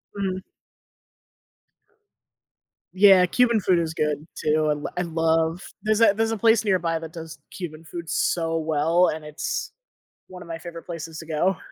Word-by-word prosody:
Mhm. 190 Hz, -2 st, -2 dB, 2.5 s
Yeah, 190 Hz, -1 st, +7 dB
Cuban 235 Hz, +3 st, +3 dB
food 180 Hz, -1 st, +3 dB
is 165 Hz, -1 st, -2 dB
good 150 Hz, -1 st, -2 dB
too, 155 Hz, 0 st, +1 dB
I -, -, +3 dB
l 150 Hz, 0 st, -3 dB
I -, -, +1 dB
love 165 Hz, +1 st, 0 dB, 0.2 s
there's 215 Hz, +1 st, +1 dB
a 225 Hz, -3 st, +6 dB
there's 225 Hz, +1 st, 0 dB
a 225 Hz, -, -1 dB
place 225 Hz, +1 st, +4 dB
nearby 170 Hz, -5 st, +1 dB
that 160 Hz, 0 st, -9 dB
does 160 Hz, -3 st, -8 dB
Cuban 160 Hz, -3 st, -7 dB
food 165 Hz, +1 st, -8 dB
so 165 Hz, -1 st, 0 dB
well, 160 Hz, +3 st, +2 dB
and 155 Hz, 0 st, -4 dB
it's 150 Hz, 0 st, -4 dB, 0.6 s
one 185 Hz, -1 st, -11 dB
of -, -, -11 dB
my 165 Hz, -, -5 dB
favorite 165 Hz, 0 st, -9 dB
places 165 Hz, -2 st, -6 dB
to 160 Hz, -, -10 dB
go. 165 Hz, +4 st, +1 dB
165 Hz, 165 wpm, -24 LUFS, 160-185 Hz, 2.5 s, Yeah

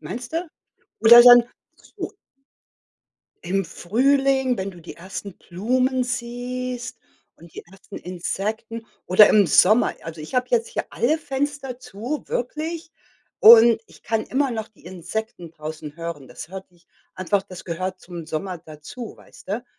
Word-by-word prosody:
Meinst 245 Hz, +2 st, -7 dB
du? 335 Hz, +2 st, -2 dB, 0.5 s
Oder 235 Hz, +2 st, +9 dB
dann 245 Hz, -1 st, +9 dB, 0.4 s
ach -, -, -24 dB
so. -, -, -5 dB, 1.3 s
Im 190 Hz, +1 st, -1 dB
Frühling, 265 Hz, -, +1 dB
wenn 190 Hz, +1 st, -4 dB
du 175 Hz, -2 st, -14 dB
die 165 Hz, -, -11 dB
ersten 190 Hz, +2 st, -8 dB
Blumen 255 Hz, +8 st, -1 dB
siehst 250 Hz, 0 st, -5 dB, 0.4 s
und 170 Hz, -1 st, -17 dB
die -, -, -8 dB
ersten 195 Hz, +1 st, -11 dB
Insekten 215 Hz, +6 st, -5 dB, 0.2 s
oder 205 Hz, +3 st, +7 dB
im 205 Hz, -2 st, +5 dB
Sommer, 215 Hz, +8 st, +4 dB
also, 165 Hz, -1 st, -8 dB
ich 155 Hz, -, -10 dB
habe 250 Hz, 0 st, +1 dB
jetzt 230 Hz, -1 st, +1 dB
hier -, -, -4 dB
alle 305 Hz, +7 st, 0 dB
Fenster 275 Hz, -3 st, -4 dB
zu, 245 Hz, +8 st, -6 dB
wirklich, 320 Hz, +6 st, -4 dB, 0.5 s
und 230 Hz, 0 st, +9 dB
ich -, -, -19 dB
kann 225 Hz, -1 st, -1 dB
immer 270 Hz, +1 st, 0 dB
noch 220 Hz, -2 st, -4 dB
die 195 Hz, -5 st, -22 dB
Insekten 185 Hz, 0 st, -6 dB
draußen 155 Hz, -1 st, -8 dB
hören. 165 Hz, -4 st, -7 dB
Das 155 Hz, -, -10 dB
hört 190 Hz, 0 st, -9 dB
sich 175 Hz, -1 st, -28 dB, 0.3 s
einfach 190 Hz, +2 st, 0 dB
das 185 Hz, -1 st, -12 dB
gehört 185 Hz, +2 st, -4 dB
zum 175 Hz, -2 st, -9 dB
Sommer 175 Hz, +4 st, -4 dB
dazu, 160 Hz, +10 st, -10 dB
weißt -, -, -18 dB
du? 220 Hz, +5 st, -3 dB
220 Hz, 150 wpm, -22 LUFS, 180-250 Hz, 1.3 s, Oder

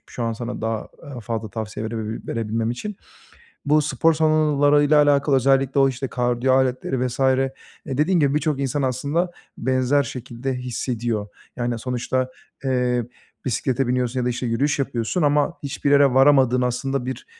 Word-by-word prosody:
şu 120 Hz, -, -6 dB
an 115 Hz, 0 st, 0 dB
sana 120 Hz, +2 st, -5 dB
daha 110 Hz, -1 st, -3 dB, 0.3 s
fazla 115 Hz, -1 st, -4 dB
tavsiye 110 Hz, +1 st, -5 dB
verebi 110 Hz, 0 st, -5 dB
verebilmem 115 Hz, 0 st, -2 dB
için. 195 Hz, -, -5 dB, 0.7 s
Bu 150 Hz, +1 st, +4 dB
spor 160 Hz, +2 st, +2 dB
salonlarıyla 150 Hz, -1 st, +4 dB
alakalı 145 Hz, -1 st, +3 dB
özellikle 135 Hz, +1 st, +2 dB
o, 135 Hz, 0 st, +5 dB
işte, 135 Hz, +1 st, -4 dB
kardiyo 125 Hz, +1 st, 0 dB
aletleri, 130 Hz, 0 st, +1 dB
vs. 125 Hz, -, -7 dB
eee, 135 Hz, 0 st, +3 dB, 0.4 s
dediğin 155 Hz, +7 st, +1 dB
gibi 140 Hz, -2 st, +2 dB
birçok 150 Hz, -1 st, 0 dB
insan 140 Hz, +1 st, -1 dB
aslında 140 Hz, +7 st, -1 dB, 0.3 s
benzer 130 Hz, +3 st, +2 dB
şekilde 125 Hz, 0 st, -5 dB
hissediyor. 120 Hz, -3 st, -3 dB, 0.3 s
Yani, 120 Hz, -1 st, -2 dB
sonuçta, 125 Hz, +1 st, -2 dB, 0.3 s
eee, 125 Hz, -2 st, +1 dB, 0.4 s
bisiklete 130 Hz, 0 st, 0 dB
biniyorsun 125 Hz, 0 st, 0 dB
ya 125 Hz, -, -1 dB
da, -, -, +1 dB
işte, 125 Hz, +1 st, -3 dB
yürüyüş 135 Hz, +6 st, 0 dB
yapıyorsun 130 Hz, +4 st, -1 dB
ama 145 Hz, +2 st, +2 dB
hiçbir 140 Hz, 0 st, -1 dB
yere 140 Hz, -2 st, +5 dB
varamadığın 130 Hz, -2 st, +5 dB
aslında 125 Hz, +1 st, -1 dB
bir, 130 Hz, -, -5 dB
130 Hz, 150 wpm, -22 LUFS, 120-140 Hz, 0.7 s, o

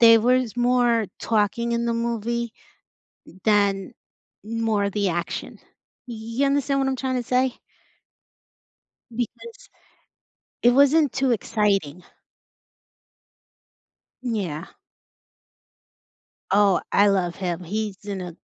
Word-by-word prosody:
there 230 Hz, -1 st, +8 dB
was 250 Hz, -1 st, +2 dB
more 240 Hz, -3 st, +2 dB
talking 230 Hz, +2 st, 0 dB
in 235 Hz, 0 st, 0 dB
the 235 Hz, -, +1 dB
movie 235 Hz, 0 st, -2 dB, 0.9 s
than 200 Hz, -3 st, +2 dB, 0.5 s
more 225 Hz, -2 st, 0 dB
of 200 Hz, -, -1 dB
the 205 Hz, -2 st, 0 dB
action. 170 Hz, +1 st, -4 dB, 0.5 s
Y 240 Hz, -, -5 dB, 0.3 s
you 280 Hz, -, +4 dB
understand 275 Hz, 0 st, +1 dB
what 270 Hz, -, +1 dB
I'm 265 Hz, -, -1 dB
trying 260 Hz, 0 st, -2 dB
to 245 Hz, -, -1 dB
say? 255 Hz, +1 st, +1 dB, 1.6 s
Because 455 Hz, -, -6 dB, 0.9 s
it 240 Hz, -, +6 dB
wasn't 280 Hz, +2 st, +4 dB
too 265 Hz, -1 st, +1 dB
exciting. 195 Hz, -7 st, 0 dB, 2.2 s
Yeah. 195 Hz, -11 st, -4 dB, 1.8 s
Oh, 200 Hz, -3 st, +4 dB
I 205 Hz, +1 st, +5 dB
love 185 Hz, -3 st, +1 dB
him, 180 Hz, -2 st, -3 dB
he's 210 Hz, +2 st, -4 dB
in 200 Hz, -2 st, -4 dB
a 175 Hz, -2 st, -7 dB
230 Hz, 105 wpm, -24 LUFS, 200-250 Hz, 2.2 s, there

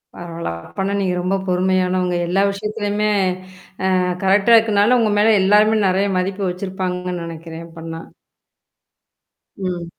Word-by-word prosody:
பரவால்ல. 170 Hz, -, -6 dB, 0.2 s
அப்பன்னா, 195 Hz, +1 st, -3 dB
நீங்க 185 Hz, -2 st, 0 dB
ரொம்ப 185 Hz, +2 st, 0 dB
பொறுமையானவங்க, 185 Hz, 0 st, +1 dB
எல்லா 190 Hz, +3 st, +1 dB
விஷயத்துலயுமே, 210 Hz, 0 st, -2 dB, 0.9 s
அ -, -, +2 dB, 0.3 s
கரெக்ட்டா 200 Hz, +4 st, +4 dB
இருக்கனால, 220 Hz, +1 st, +3 dB
உங்க 215 Hz, -2 st, +1 dB
மேல 215 Hz, +1 st, +5 dB
எல்லாருமே 210 Hz, +3 st, +4 dB
நெறைய 190 Hz, +2 st, +1 dB
மதிப்பு 195 Hz, +2 st, -2 dB
வச்சிருப்பாங்கன்னு 180 Hz, -1 st, -4 dB
நெனைக்கிறன், 165 Hz, 0 st, -8 dB
அப்பன்னா. 165 Hz, 0 st, -8 dB, 1.6 s
ம் 180 Hz, -3 st, -4 dB
190 Hz, 115 wpm, -19 LUFS, 180-205 Hz, 1.6 s, மேல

